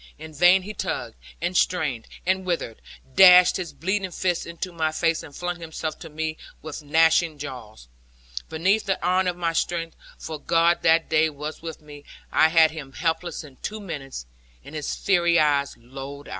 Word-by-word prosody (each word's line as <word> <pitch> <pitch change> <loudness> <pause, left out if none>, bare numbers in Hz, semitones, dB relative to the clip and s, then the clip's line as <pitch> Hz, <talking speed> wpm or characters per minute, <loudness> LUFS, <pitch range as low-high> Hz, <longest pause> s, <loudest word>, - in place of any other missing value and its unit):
In 155 +1 -10
vain 180 +5 +5
he 210 +3 -7
tugged, - - -4 0.3
and 175 +1 -1
strained, 150 -12 0 0.2
and 190 +1 +1
writhed, 170 -11 -3 0.3
dashed 180 +2 +8
his 180 -3 -5
bleeding 190 +2 -2
fist 180 -1 -1
into 170 +2 -5
my 160 -2 0
face, 165 +1 0
and 145 - -12
flung 175 0 -4
himself 160 -1 -5
on 160 -2 -12
me 160 0 -3 0.3
with 155 0 -7
gnashing 160 +1 +3
jaws. 120 - -9 0.6
Beneath 190 +7 +1
the 195 -3 -1
iron 185 +1 +2
of 175 -1 -1
my 170 -2 -1
strength 165 0 -2 0.2
for 160 -1 -7
God 170 +3 +2
that 165 0 +3
day 160 0 +3
was 150 +1 -7
with 165 -2 -7
me 145 -1 -12 0.3
I 155 - +5
had 160 -1 +5
him 145 -4 -9
helpless 165 +2 -2
in 140 -4 -14
two 215 +1 -5
minutes, 140 - -7 0.4
and - - -12
his 150 -2 -3
fiery 170 -3 +2
eyes 145 -2 +1
lolled 135 +4 -9
out. - - -11
160 Hz, 180 wpm, -24 LUFS, 150-175 Hz, 0.6 s, dashed